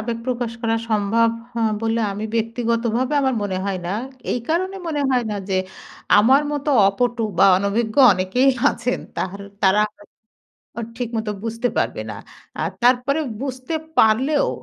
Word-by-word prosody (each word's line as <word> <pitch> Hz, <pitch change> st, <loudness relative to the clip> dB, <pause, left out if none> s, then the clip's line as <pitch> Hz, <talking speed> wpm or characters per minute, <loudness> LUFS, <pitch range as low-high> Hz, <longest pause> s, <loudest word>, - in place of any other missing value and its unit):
আবেগ 230 Hz, +1 st, -3 dB
প্রকাশ 245 Hz, -2 st, -2 dB
করা 225 Hz, 0 st, +1 dB
সম্ভব 220 Hz, +2 st, +2 dB, 0.2 s
হ -, -, -15 dB, 0.3 s
বলে 225 Hz, +1 st, 0 dB
আমি 205 Hz, +2 st, -5 dB
ব্যক্তিগতভাবে 230 Hz, +3 st, 0 dB
আমার 265 Hz, -2 st, +1 dB
মনে 190 Hz, -2 st, -2 dB
হয় 195 Hz, -2 st, -2 dB
না -, -, -3 dB, 0.4 s
এই 245 Hz, -, -1 dB
কারণে 370 Hz, +4 st, 0 dB
মনে 305 Hz, -3 st, -1 dB
হয় 250 Hz, -2 st, +2 dB
না 210 Hz, -, -2 dB
যে 190 Hz, -, 0 dB, 0.6 s
আমার 260 Hz, +7 st, +5 dB
মতো 290 Hz, 0 st, -1 dB, 0.2 s
অপটু 240 Hz, +3 st, -1 dB, 0.2 s
বা -, -, +7 dB
অনভিজ্ঞ 215 Hz, +3 st, -1 dB, 0.2 s
অনেকেই 190 Hz, +9 st, +2 dB, 0.2 s
আছেন, 250 Hz, +1 st, -2 dB, 0.2 s
তাহর 195 Hz, +2 st, -3 dB, 0.2 s
তারা 190 Hz, +2 st, +4 dB, 1.0 s
উ -, -, -2 dB, 0.2 s
ঠিকমতো 225 Hz, -3 st, -3 dB
বুঝতে 230 Hz, +2 st, -1 dB
পারবে -, -, -1 dB
না -, -, -7 dB, 0.5 s
আর -, -, 0 dB
তারপরে 255 Hz, +4 st, +3 dB, 0.2 s
বুঝতে 260 Hz, +2 st, -5 dB, 0.2 s
পারলেও 255 Hz, +7 st, +3 dB
230 Hz, 150 wpm, -21 LUFS, 215-255 Hz, 1.0 s, বা